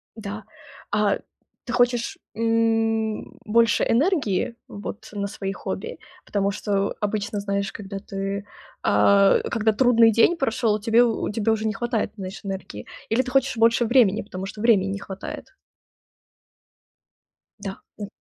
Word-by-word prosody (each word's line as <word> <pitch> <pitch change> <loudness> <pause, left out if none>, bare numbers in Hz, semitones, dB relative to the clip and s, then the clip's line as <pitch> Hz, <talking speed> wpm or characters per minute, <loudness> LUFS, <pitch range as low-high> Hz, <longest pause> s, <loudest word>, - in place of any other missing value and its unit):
Да. 210 -1 -6 0.5
А 205 -1 +2 0.5
ты 240 - -4
хочешь, 245 -1 +1 0.2
м, 225 -1 0
больше 230 0 +3
энергии 245 - +1
вот 205 0 -8
на 200 -1 -2
свои 195 -1 -4
хобби? - - -5 0.3
Потому 200 -1 0
что 200 -1 -1
обычно 205 0 -2
знаешь, 200 0 -2
когда 195 -2 -7
ты, 195 0 -4 0.4
а, 200 -1 +5
когда 220 -1 +2
трудный 230 0 +5
день 230 +10 +4
прошёл, 225 -5 +1
тебе 230 +3 +4
у 230 -2 0
тебя 220 +1 +1
уже 220 0 -1
не 215 - 0
хватает, 235 -3 -1
знаешь, 190 0 -7
энергии? 190 - -6 0.2
Или 230 +4 +3
ты 255 -1 -6
хочешь 270 -2 +2
больше 230 +1 +4
времени, 225 -4 +4
потому 190 -2 -7
что 210 - -9
времени 210 -4 +4
не 200 - -4
хватает? 195 -1 -8 2.1
Да, 195 -1 -6 0.2
м. 205 - -4
215 Hz, 140 wpm, -24 LUFS, 200-230 Hz, 2.1 s, а